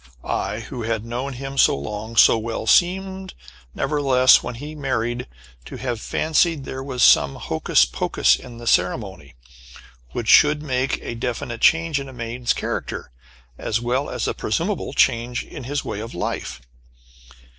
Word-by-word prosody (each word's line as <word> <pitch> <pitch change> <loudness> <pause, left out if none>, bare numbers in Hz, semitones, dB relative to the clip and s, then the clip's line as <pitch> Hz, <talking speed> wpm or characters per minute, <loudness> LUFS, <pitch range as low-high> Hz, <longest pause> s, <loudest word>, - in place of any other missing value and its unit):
I, - - -2
who 125 - -7
had 115 -1 -2
known 125 +4 -4
him 135 +1 -5
so - - +5
long, 105 +10 -6
so - - +7
well, 115 0 -4
seemed, 190 +5 +1 0.4
nevertheless, 135 -3 +4
when 125 - -6
he 145 +5 -8
married, 125 - -2 0.4
to - - -9
have 120 -4 -4
fancied 160 -1 +1
there 130 0 -6
was 130 -2 -1
some 70 -1 +5
hocus - - +2
pocus 60 +1 +2
in 120 - -11
the 120 - -10
ceremony, 90 - 0 0.8
which 115 - -4
should 150 +3 +5
make 130 -2 -1
a - - -5
definite 120 0 -4
change 165 -2 +3
in 135 -1 -7
a - - -11
man's 120 0 -3
character, - - -4 0.5
as 110 - -1
well 125 +4 -1
as - - -3
a - - -1
presumable - - -2
change 120 +1 +1
in 125 - -10
his 145 +2 -3
way 100 - -4
of 115 -1 -7
life. 85 - -4
125 Hz, 155 wpm, -22 LUFS, 115-140 Hz, 0.8 s, so